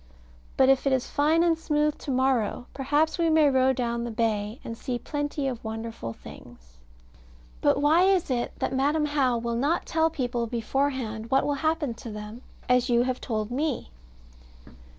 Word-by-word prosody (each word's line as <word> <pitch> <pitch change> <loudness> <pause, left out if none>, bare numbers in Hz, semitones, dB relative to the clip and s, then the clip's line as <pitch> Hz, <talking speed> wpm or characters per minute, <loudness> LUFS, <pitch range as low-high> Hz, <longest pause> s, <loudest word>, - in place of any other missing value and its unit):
But 265 - +5
if 270 +1 +3
it 270 - +3
is 260 -1 -1
fine 310 +3 +3
and 340 -1 +3
smooth 300 -2 0
to - - -8
morrow, 255 -3 +1
perhaps 295 +5 0
we 335 -1 +3
may 310 -2 +5
row 260 0 +4
down 235 -2 -2
the 240 - -3
bay, 220 0 -1
and 230 - -6
see 245 +1 -3
plenty 290 +1 -3
of 245 -3 -4
wonderful 225 - -5
things. - - -14 0.8
But - - +3
why 315 +5 +4
is 380 -7 +2
it 240 -1 -1
that - - -2
Madam 290 +3 +1
How 275 -5 +1
will 235 0 -3
not 290 +8 0
tell 320 0 +2
people 245 -6 -2
beforehand 235 -1 -2
what 270 +1 +3
will 290 - +1
happen 315 -5 0
to 230 0 -9
them, 210 +2 -8 0.3
as 250 0 +3
you 240 0 +4
have 255 0 -2
told 215 -1 -3
me? 275 - -2
260 Hz, 175 wpm, -26 LUFS, 235-295 Hz, 0.8 s, But